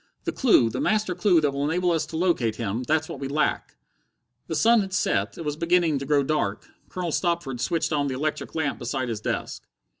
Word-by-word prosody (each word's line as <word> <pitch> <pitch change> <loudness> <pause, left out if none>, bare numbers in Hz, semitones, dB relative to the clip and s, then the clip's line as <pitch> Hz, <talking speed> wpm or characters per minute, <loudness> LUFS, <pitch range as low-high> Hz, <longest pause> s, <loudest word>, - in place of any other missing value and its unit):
The - - -1
clue, 170 - +4
the - - -3
master 215 -3 +1
clue 180 -3 +3
that 145 -2 +1
will 140 +1 -2
enable 175 +4 +1
us 165 -2 0
to 160 - -5
locate 160 -11 +1
him 115 0 -3
that's 155 +4 0
what - - -7
we 135 - -3
lack." 145 +2 -1 0.7
The 160 - -3
sun 230 +8 +5
had 190 -1 -5
set, 100 - 0
it 165 - -6
was 150 -1 -2
beginning 170 -2 +2
to 135 - -6
grow 145 -1 +3
dark. 135 -9 -1 0.2
Colonel 180 -2 -3
Stopford 170 -8 -1
switched 165 +1 0
on 145 -1 +1
the 130 - -2
electric 150 +4 -3
lamp 160 -3 -1
beside 125 +1 -3
his 110 -2 -4
desk. - - -4
150 Hz, 215 wpm, -25 LUFS, 135-170 Hz, 0.7 s, sun